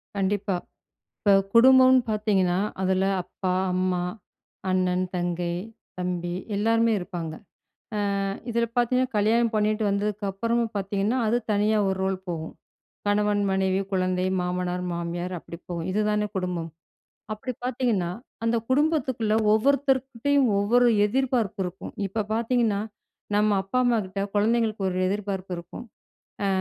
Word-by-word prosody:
கண்டிப்பா. 195 0 0 0.6
இப்ப 200 -2 +4 0.2
குடும்பம்னு 260 +2 +7
பாத்ததீங்கன்னா, 200 -4 +1 0.2
அதில 190 0 +2 0.2
அப்பா, 180 +1 -3 0.2
அம்மா, 185 -1 0 0.7
அண்ணன், 185 0 +1
தங்கை, 175 -1 -1 0.4
தம்பி 175 -1 -2 0.2
எல்லாருமே 225 +2 +3
இருப்பாங்க. 175 -4 -5 0.9
அ, - - 0 0.3
இதுல 235 0 +1
பாத்ததீங்கன்னா, 250 +1 +3
கல்யாணம் 225 +3 +3
பண்ணிட்டு 215 +1 +1
வந்ததுக்கு 205 +1 -1
அப்பறமும் 230 +3 -1
பாத்தீங்கனா, 200 +4 0
அது 235 +3 +2
தனியா 210 +1 +2
ஒரு 190 - 0
ரோல் 190 0 0
போகும். 160 -2 -4 0.5
கணவன், 205 0 +2
மனைவி, 190 0 +1
குழந்தை, 185 -1 +1
மாமனார், 180 0 -2
மாமியார் 170 +1 -3
அப்டி 170 - -10
போகும் 170 -2 -5
இதுதானே 210 +1 +1
குடும்பம். 180 -3 -2 0.6
அப்டி 215 +4 -4
பாத்தீங்கன்னா, 235 -8 0 0.3
அந்த 230 +1 +2
குடும்பத்துக்குள்ள 260 -6 +1 0.2
ஒவ்வொருத்தர்கிட்டயும் 270 +2 +2
ஒவ்வொரு 240 +5 +4 0.2
எதிர்பார்ப்பு 245 -4 0
இருக்கும். 180 +1 -7
இப்ப 210 +2 -2
பாத்தீங்கணா, 230 -2 +1 0.6
நம்ம 210 -1 +3
அப்பா, 195 +6 -2
அம்மாகிட்ட 210 -5 0
குழந்தைங்களுக்கு 215 -1 +1
ஒரு 180 - -2
எதிர்பார்ப்பு 195 -2 -3
இருக்கும். 175 +8 -9 0.6
அ, - - +2
205 Hz, 115 wpm, -25 LUFS, 185-230 Hz, 0.9 s, குடும்பம்னு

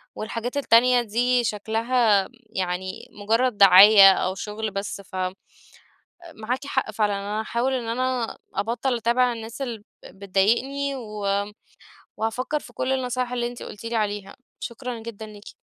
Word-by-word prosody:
والحاجات 230 +4 -4
التانية 250 -2 +4
دي 240 +2 +1
شكلها 220 -1 +1 0.3
يعني 185 0 -3
مجرد 225 +3 0
دعاية 195 +1 +9
أو 185 0 -2
شغل 215 +2 -5
بس، 200 0 -5
ف 190 - -14 1.2
مَعَاكِ 250 +6 -4
حَقّ 265 -5 -1
فِعْلًا 210 -1 0
أنا 205 +2 -3
هاحاول 235 +4 -1
إن 245 -3 -3
أنا 250 0 -2 0.2
أبطل 240 +3 -1
أتابع 240 +2 +2
الناس 225 +3 -8
اللي 235 -6 -5 0.3
بتضايقني، 235 +9 0
و 210 -5 -7 0.9
وهافكر 250 +7 -2
في - - -15
كل 260 - -2
النصايح 250 -1 -2
اللي 240 -1 -1
أنتِ 240 0 -8
قلتِ 210 - -10
لي 230 +1 -3
عليها، 205 -2 -2 0.2
شكرًا 245 -1 -6
جدًا 225 -1 -8
ليكِ. 210 0 -12
225 Hz, 140 wpm, -24 LUFS, 205-250 Hz, 1.2 s, دعاية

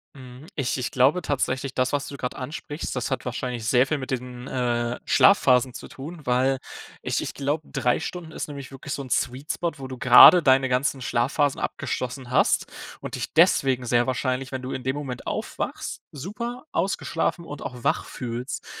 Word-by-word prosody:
Mhm. 130 +2 -12
Ich 140 -4 -1
ich 125 - -2
glaube 135 +8 +3
tatsächlich, 135 -1 -1
das, 130 0 +1
was 145 -1 -1
du 140 - -7
gerade 125 -2 -4
ansprichst, 145 +3 -5
das 125 - -2
hat - - -2
wahrscheinlich 125 -1 -3
sehr 125 +3 +4
viel 155 +1 -1
mit 130 - -6
diesen, 125 0 -5
äh, 120 -1 -1
Schlafphasen 130 -10 +5
zu - - -8
tun, 155 +5 -9
weil 130 +2 +2 0.4
ich - - -1
ich - - -5
glaube, 145 +2 -2
3 130 -2 +1
Stunden 165 -1 -6
ist - - -5
nämlich 140 -2 -8
wirklich 140 +2 -6
so 140 - -4
'n 130 - -10
Sweet 130 +4 -1
Spot, 170 -1 -2
wo 135 -2 -7
du 130 -1 -8
grade 125 +9 +9
deine 135 -1 +4
ganzen 130 +2 +1
Schlafphasen 135 +4 +1
abgeschlossen 125 0 -4
hast 130 - +3 0.3
und - - -5
dich - - -5
deswegen 130 -2 +4
sehr 120 +1 +2
wahrscheinlich, 130 0 -1
wenn 130 -1 -4
du 130 - -5
in 130 - -4
dem 130 +3 -1
Moment 130 -4 -6
aufwachst, - - -4
super 215 - -6
ausgeschlafen 170 -1 -1
und 145 -3 -8
auch 125 -3 -7
wach - - +1
fühlst. 125 +2 -5
130 Hz, 190 wpm, -25 LUFS, 125-145 Hz, 0.4 s, grade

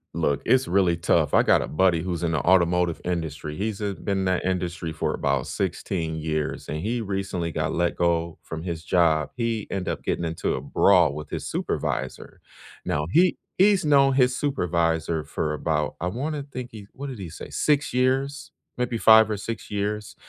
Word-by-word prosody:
Look. 70 -4 0
It's 130 0 +3
really 90 -2 +2
tough. 85 - +2
I - - +6
got - - +4
a - - -3
buddy 85 0 +2
who's 90 -1 -3
in 85 - +1
the 80 - +1
automotive 90 0 +3
industry. 80 -4 -3
He's, 105 +2 -3
uh, 100 -1 -1
been 100 -1 0
in 95 - -1
that 95 -1 0
industry 90 -3 -2
for 80 - -2
about - - 0
16, 80 -3 -3
and 75 - -3
he 115 +7 -2
recently 95 -5 -3
got - - -2
let 85 0 0
go 85 -1 0
from 80 0 -7
his 85 -3 -4
job. 80 -3 +2
He 115 -3 -2
ended 95 -2 -3
up - - -4
getting 85 - -1
into 80 0 -2
a - - -4
brawl 90 -7 +4
with 75 0 -7
his - - -4
supervisor. 65 +1 -3 0.4
Now 75 0 -1
he 180 +2 +4 0.2
he's 195 -3 +4
known 140 -2 +5
his 130 -1 +3
supervisor 85 - 0
for 75 - -2
about 75 0 -1
I 90 - -1
wanna 145 - -3
think 130 -3 -7
he 105 -3 -10
what 140 +1 -7
did 125 - -7
he 90 -4 -6
say? - - -9
6 145 -4 +1
years? 135 +3 0 0.3
Maybe 125 -1 -1
5 110 -1 +7
or 105 - 0
6 115 +3 -6
years. 105 +1 -3
90 Hz, 190 wpm, -25 LUFS, 80-115 Hz, 0.4 s, 5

